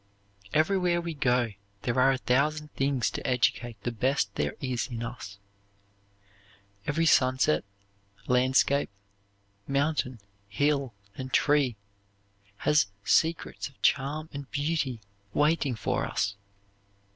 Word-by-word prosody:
Everywhere 175 Hz, +2 st, +2 dB
we 170 Hz, -1 st, -4 dB
go 125 Hz, -6 st, +1 dB, 0.3 s
there 120 Hz, +3 st, 0 dB
are 130 Hz, +1 st, +6 dB
a 135 Hz, -, 0 dB
thousand 150 Hz, +4 st, 0 dB
things 135 Hz, -2 st, 0 dB
to -, -, -4 dB
educate 120 Hz, -2 st, 0 dB
the 120 Hz, -, -1 dB
best 120 Hz, -3 st, 0 dB
there 75 Hz, -4 st, -2 dB
is 130 Hz, -3 st, -2 dB
in 120 Hz, -3 st, -5 dB
us. 115 Hz, -4 st, -7 dB, 1.5 s
Every 165 Hz, +3 st, +1 dB
sunset, 130 Hz, -, +3 dB, 0.6 s
landscape, 130 Hz, +3 st, +3 dB, 0.8 s
mountain, 140 Hz, -3 st, 0 dB, 0.3 s
hill, 140 Hz, -1 st, 0 dB, 0.2 s
and 130 Hz, 0 st, -6 dB
tree 145 Hz, -5 st, +3 dB, 0.9 s
has 150 Hz, -8 st, +4 dB, 0.2 s
secrets 165 Hz, +1 st, +1 dB
of 140 Hz, -, -26 dB
charm 145 Hz, +3 st, +1 dB
and 140 Hz, -1 st, -7 dB
beauty 145 Hz, -5 st, -1 dB, 0.3 s
waiting 145 Hz, -3 st, +2 dB
for 110 Hz, -, -1 dB
us. 100 Hz, 0 st, -1 dB
135 Hz, 110 wpm, -28 LUFS, 125-150 Hz, 1.5 s, are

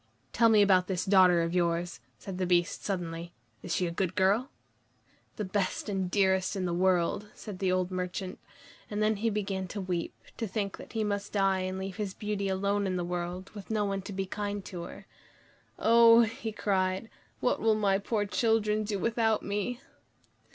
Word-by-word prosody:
"Tell 230 Hz, 0 st, +5 dB
me 215 Hz, -2 st, +6 dB
about 185 Hz, -2 st, +4 dB
this 185 Hz, -2 st, -1 dB
daughter 185 Hz, -3 st, +5 dB
of 165 Hz, +1 st, -2 dB
yours," 170 Hz, -4 st, 0 dB, 0.2 s
said 185 Hz, -, -7 dB
the 185 Hz, -, 0 dB
Beast 175 Hz, +1 st, +1 dB
suddenly. 170 Hz, -3 st, -4 dB, 0.3 s
"Is -, -, -2 dB
she 180 Hz, -, +1 dB
a 170 Hz, -, -2 dB
good 185 Hz, +1 st, -2 dB
girl?" 205 Hz, +7 st, +2 dB, 0.9 s
"The 210 Hz, -, -3 dB
best 190 Hz, +2 st, -1 dB
and 190 Hz, -2 st, -1 dB
dearest 190 Hz, -1 st, +2 dB
in 190 Hz, -2 st, -1 dB
the 175 Hz, -, -1 dB
world," 185 Hz, +2 st, +1 dB
said 200 Hz, -4 st, -8 dB
the 190 Hz, -2 st, +1 dB
old 185 Hz, 0 st, 0 dB
merchant. 185 Hz, +1 st, -4 dB, 0.5 s
And 210 Hz, 0 st, -1 dB
then 215 Hz, 0 st, +2 dB
he 225 Hz, +3 st, +1 dB
began 195 Hz, -3 st, -2 dB
to 205 Hz, -, -6 dB
weep, 180 Hz, -3 st, -3 dB, 0.2 s
to 225 Hz, -, -2 dB
think 200 Hz, 0 st, -3 dB
that -, -, -12 dB
he 220 Hz, -1 st, 0 dB
must 205 Hz, -1 st, -3 dB
die 195 Hz, -2 st, +2 dB
and 185 Hz, 0 st, -3 dB
leave 190 Hz, -1 st, -5 dB
his 200 Hz, -3 st, -3 dB
Beauty 210 Hz, -2 st, -2 dB
alone 200 Hz, +1 st, 0 dB
in 185 Hz, -, -1 dB
the 175 Hz, -1 st, -1 dB
world, 180 Hz, +1 st, -4 dB
with 205 Hz, -3 st, -10 dB
no 215 Hz, -2 st, +1 dB
one 195 Hz, -1 st, -2 dB
to 195 Hz, -, -8 dB
be 195 Hz, 0 st, -2 dB
kind 205 Hz, 0 st, -4 dB
to 180 Hz, -3 st, -6 dB
her. -, -, -11 dB, 0.7 s
"Oh!" 230 Hz, 0 st, +7 dB
he 225 Hz, 0 st, -2 dB
cried, 190 Hz, 0 st, 0 dB, 0.3 s
"what -, -, 0 dB
will 220 Hz, -1 st, +4 dB
my 200 Hz, -2 st, +2 dB
poor 205 Hz, 0 st, -1 dB
children 215 Hz, 0 st, +1 dB
do 205 Hz, -1 st, -2 dB
without 225 Hz, +1 st, +1 dB
me?" 210 Hz, +5 st, -2 dB
195 Hz, 195 wpm, -29 LUFS, 185-210 Hz, 0.9 s, Oh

